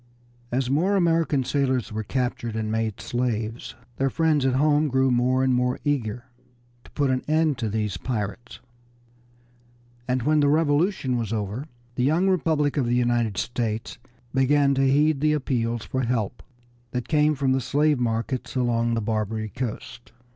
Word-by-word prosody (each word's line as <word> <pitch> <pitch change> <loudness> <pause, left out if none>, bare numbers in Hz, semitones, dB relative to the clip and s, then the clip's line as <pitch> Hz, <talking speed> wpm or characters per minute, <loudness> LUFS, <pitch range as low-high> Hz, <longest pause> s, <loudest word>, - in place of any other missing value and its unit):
As 125 +1 0
more 165 +10 +2
American 165 -6 +2
sailors 130 -4 0
were 110 - -2
captured 120 0 -2
and 110 -1 -2
made 110 -1 -1
slaves 115 -2 -3 0.2
their 135 0 +1
friends 155 -3 +2
at 130 - +1
home 150 +2 +3
grew 130 -1 +2
more 125 +2 +2
and 130 -1 +2
more 125 0 +1
eager 120 -5 -1 0.6
to - - -16
put 140 -3 +1
an 130 0 0
end 155 -3 +2
to 115 -3 -1
these 105 -3 -2
pirates, 115 +2 -4 1.5
and 125 -1 0
when 155 +3 +3
the 145 - +3
Revolution 145 -2 +1
was 115 -3 -3
over 110 +6 -3 0.3
the 125 - -1
young 160 +8 +2
Republic 160 -6 +1
of 130 -4 +1
the 120 - +1
United 120 -4 +1
States 115 0 -3 0.3
began 140 +1 +3
to 135 0 +2
heed 150 0 +3
the 150 0 +3
appeals 120 -5 -1
for 130 - -2
help 120 -2 -2 0.5
that 125 0 -4
came 150 0 +3
from 135 -1 0
the 130 0 +1
slave 145 +2 +2
markets 120 +2 -2
along 120 -2 +1
the 115 - -1
Barbary 110 0 -2
coast. 120 +2 -6
130 Hz, 160 wpm, -24 LUFS, 115-145 Hz, 1.5 s, home